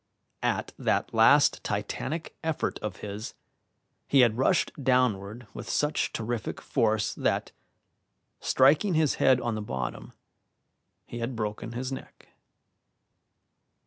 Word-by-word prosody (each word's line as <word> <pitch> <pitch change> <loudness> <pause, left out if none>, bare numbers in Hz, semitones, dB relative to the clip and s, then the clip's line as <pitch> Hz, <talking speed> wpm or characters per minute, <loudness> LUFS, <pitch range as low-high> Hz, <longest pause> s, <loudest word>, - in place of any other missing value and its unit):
At - - -1
that - - 0
last - - +5
titanic 165 +1 -3
effort 160 -1 -1
of 105 -3 -6
his 105 +2 -6 0.7
he 140 - +5
had 120 -3 +4
rushed 160 +6 +2
downward 120 -3 +1
with - - -8
such 150 +1 0
terrific 115 0 -3
force 110 -4 +1
that, - - -1 0.9
striking 150 +8 +3
his 155 -3 +2
head 130 -1 +5
on 120 -2 -2
the 110 - -3
bottom, 65 -11 -5 0.9
he 120 - -7
had 120 +2 -3
broken 110 +1 -4
his 130 +2 -4
neck. 135 - -9
120 Hz, 115 wpm, -28 LUFS, 110-135 Hz, 0.9 s, last